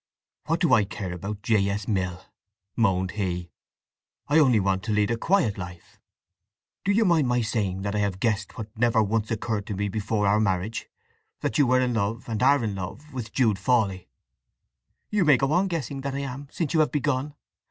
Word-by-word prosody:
"What 165 +1 0
do 170 - +3
I 105 - +6
care 95 -2 -5
about 100 +4 -6
J. 105 -3 +2
S. 100 0 -3
Mill!" 90 -3 -2 0.5
moaned 95 -4 +1
he. 90 -4 -3 0.8
"I 150 +3 +4
only 130 -7 +5
want 95 -1 +1
to 110 - -2
lead 105 +1 +2
a - - +2
quiet 135 - +1
life! 90 -2 -9 0.8
Do 200 - +2
you 220 +2 +3
mind 165 -7 +3
my 125 0 +2
saying 100 -4 -1
that 100 0 -2
I 105 - 0
have 100 -2 -1
guessed 105 -2 -1
what 110 0 -7
never 115 -1 +3
once 110 +1 -1
occurred 110 -2 -2
to 105 - -3
me 100 +1 -1
before 105 0 -1
our 100 +2 +3
marriage—that 105 +3 -3
you 140 - +5
were 130 +1 +4
in 125 -1 +1
love, 110 +1 -2
and 110 -1 -3
are 140 0 +4
in 105 -2 -1
love, 115 +11 -7
with 120 -4 -5
Jude 110 -7 +2
Fawley!" 100 -5 +1 1.0
"You 210 -3 +2
may 150 -5 +6
go 135 +3 0
on 185 +3 +3
guessing 145 -6 -3
that 135 0 -3
I 140 - -2
am, 140 +1 -6
since 160 -2 -3
you 160 - +3
have 155 - +3
begun. 145 0 -1
110 Hz, 200 wpm, -26 LUFS, 100-135 Hz, 1.0 s, I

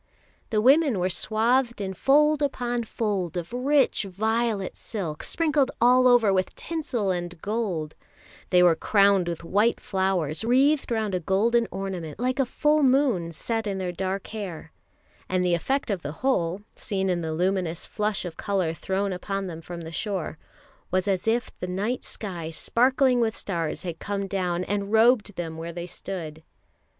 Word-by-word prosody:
The 215 -1 +1
women 275 0 +5
were 180 +1 0
swathed 235 +5 +1
in 190 -1 -3
fold 300 - +3
upon 245 -4 -1
fold 195 -6 -2
of 175 +5 -5
rich 270 +2 +2
violet 215 +1 -1
silk, 170 -9 -5
sprinkled 300 -5 +1
all 250 +2 +5
over 235 -5 +5
with 185 -1 0
tinsel 255 - -2
and 175 -1 -4
gold; 195 -8 -2 0.6
they 180 -1 +5
were 175 -2 +6
crowned 200 0 +3
with 170 -1 -4
white 210 +7 +2
flowers, 190 -4 -1
wreathed 270 +5 +3
round 220 -3 0
a 180 - +1
golden 220 +7 +2
ornament 185 -4 -5
like 255 +2 0
a 270 - +2
full 300 +4 +2
moon 255 -11 +2
set 225 +7 -3
in 195 -1 -2
their 185 -2 -2
dark 190 +2 -3
hair; 185 -7 -6 0.6
and 185 -1 +1
the 175 - +2
effect 265 +8 0
of 190 -3 -2
the 145 - -5
whole, 185 -7 +1
seen 190 -2 -2
in 180 -2 0
the 160 -1 -3
luminous 175 0 0
flush 210 -2 -2
of 165 -2 -7
colour 190 -6 0
thrown 190 +3 -2
upon 195 +2 -3
them 165 -3 -6
from 170 +1 -8
the 165 0 -7
shore, 180 -4 -3 0.5
was 185 +1 0
as 195 +1 0
if 235 +1 +1
the 180 - -4
night 200 +7 -2
sky 175 -6 -5
sparkling 250 - +2
with 225 -2 +1
stars 170 -4 -3
had 170 -3 -5
come 200 -1 -3
down 185 -2 -1
and 200 +1 -2
robed 220 -2 +4
them 165 -2 -5
where 165 +1 -5
they 170 0 -6
stood. 165 -3 -6
195 Hz, 170 wpm, -26 LUFS, 175-235 Hz, 0.6 s, were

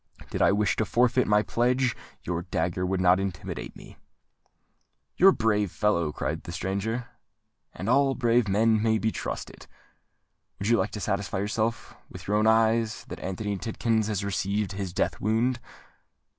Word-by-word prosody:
"Did - - -2
I - - +5
wish 105 0 +1
to 110 - +1
forfeit 125 +5 +2
my 105 0 +4
pledge, 125 +2 +1 0.3
your 85 -1 -2
dagger 90 0 -2
would 95 0 -1
not 90 0 +4
intimidate 95 -4 -5
me." - - -13 1.2
"You 185 - +6
are - - +11
a - - +6
brave 105 - +1
fellow," 85 -7 +1
cried 80 +2 -3
the 85 - -8
stranger; 100 +7 -3 0.6
"and 95 - -7
all 135 +2 +3
brave 120 -1 +2
men 110 +2 +3
may 110 0 +2
be 110 +1 0
trusted. - - -6 0.9
Would 100 - -2
you 120 - +5
like 95 +2 0
to 105 - -4
satisfy 100 -2 -2
yourself, 110 +3 -2
with - - -11
your 105 +1 +2
own 110 +1 +3
eyes, 110 0 +2
that - - -7
Anthony 100 +2 -3
Tidkins 110 0 0
has 100 -2 -2
received 100 +1 -1
his 95 -2 -4
death 90 - -1
wound?" 115 +4 +1
105 Hz, 170 wpm, -27 LUFS, 95-115 Hz, 1.2 s, are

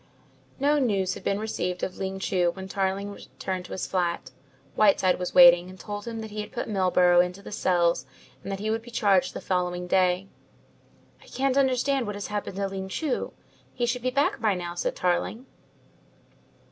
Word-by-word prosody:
No 290 +2 +3
news 195 -8 +1
had - - -9
been 200 - 0
received 180 -4 -3
of 185 - -3
Ling 190 0 -3
Chu 180 -2 +1
when 190 0 -8
Tarling 195 +1 -2
returned 185 -2 -6
to - - -12
his 185 - -3
flat. 170 -7 -2 0.4
Whiteside 195 -4 +3
was 180 - -4
waiting; 175 0 +8
and 185 0 -12
told 205 +3 -6
him 225 -1 -4
that 220 -1 -8
he 210 0 -4
had 210 0 -8
put - - -4
Milburgh 180 -3 +4
into 180 +2 -6
the - - -9
cells 175 -7 +1 0.3
and 195 - -6
that 195 - -3
he 215 +2 -1
would 225 +1 -1
be 235 - -13
charged 200 -5 +2
the - - -5
following 180 -1 -1
day. 180 +1 +2 0.9
"I - - -18
can't 270 0 0
understand 265 -1 +2
what 205 - -4
has 205 - -5
happened 205 -2 -3
to 200 0 -1
Ling 190 0 -5
Chu. 290 +6 -2 0.4
He 240 - 0
should 240 +1 -1
be 255 - 0
back 265 -1 +1
by 215 -4 +2
now," 175 -1 -5
said 175 - -2
Tarling. 185 +7 -1
195 Hz, 195 wpm, -26 LUFS, 180-220 Hz, 0.9 s, waiting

